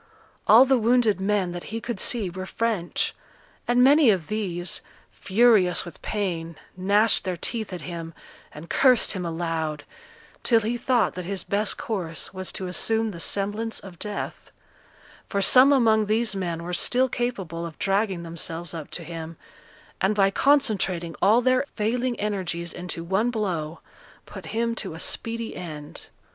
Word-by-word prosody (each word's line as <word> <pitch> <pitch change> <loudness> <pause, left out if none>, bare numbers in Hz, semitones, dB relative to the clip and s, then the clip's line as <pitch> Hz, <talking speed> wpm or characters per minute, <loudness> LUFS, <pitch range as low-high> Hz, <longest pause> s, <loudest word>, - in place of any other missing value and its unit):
All 235 +4 +8
the 265 -1 +3
wounded 225 -4 +3
men 195 -2 +1
that 175 0 -6
he 225 +1 -4
could 230 -2 -5
see 225 -2 +1
were 185 +1 -6
French; 220 -7 -1 0.5
and 245 +1 +4
many 285 0 +6
of 185 -7 +1
these, 185 -5 -2 0.3
furious 200 -4 +3
with 175 - -11
pain, 170 -6 -3 0.2
gnashed 200 +4 +3
their 185 -2 -3
teeth 220 +3 -3
at 180 - -6
him, 165 -2 -7 0.4
and 150 +3 -10
cursed 255 +2 +4
him 180 -3 -2
aloud, 160 -3 -3 0.6
till 230 -2 +3
he 225 +3 -1
thought 245 0 +1
that 180 -1 -6
his 195 -1 -2
best 205 +1 0
course 180 -8 -4
was 185 0 -4
to 190 - -4
assume 220 +4 0
the 170 - -9
semblance 205 +5 -2
of 185 -4 -12
death; 210 -1 -5 0.8
for 200 - 0
some 255 +7 +7
among 220 -5 +4
these 215 0 +1
men 170 -3 -3
were 180 +1 -5
still 255 +8 +2
capable 200 -10 -3
of 165 -2 -7
dragging 195 -2 0
themselves 170 +1 -5
up 160 -3 -7
to - - -6
him, 165 -1 -7 0.6
and 200 +3 +2
by 195 -1 +4
concentrating 195 - +1
all 225 +5 +5
their 255 +1 +3
failing 240 +3 -1
energies 180 -5 -2
into 175 -1 -5
one 195 +7 +1
blow, 175 -9 -3 0.4
put - - -10
him 230 +1 -1
to 190 -7 -4
a - - -9
speedy 230 +3 -3
end. 150 -4 -8
195 Hz, 160 wpm, -25 LUFS, 175-225 Hz, 0.8 s, All